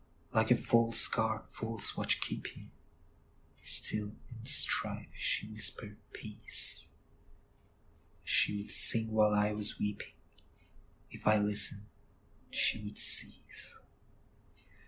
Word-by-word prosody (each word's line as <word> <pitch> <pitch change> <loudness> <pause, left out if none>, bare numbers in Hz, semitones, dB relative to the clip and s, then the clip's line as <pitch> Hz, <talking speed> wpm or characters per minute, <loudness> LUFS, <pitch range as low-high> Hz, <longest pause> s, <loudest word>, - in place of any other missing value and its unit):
Like 110 -1 0
a 125 - +4
false 115 -1 0
guard, 110 -1 -4
false 110 -1 -8
watch - - -3
keeping, - - -9 0.9
Still, 105 0 +4 0.2
in 115 -2 -13
strife, 140 +2 +2
she 105 - -4
whispered 105 -1 -5 0.2
peace; 105 0 0 1.3
She 105 - -1
would - - -10
sing 110 -1 +3
while 105 -1 +1
I 105 0 -1
was 105 0 -2
weeping; 105 0 -7 1.0
If - - -11
I 105 0 +3
listened, 105 0 +4 0.6
she - - -2
would 105 0 -11
cease. - - +1
105 Hz, 105 wpm, -30 LUFS, 105-110 Hz, 1.3 s, a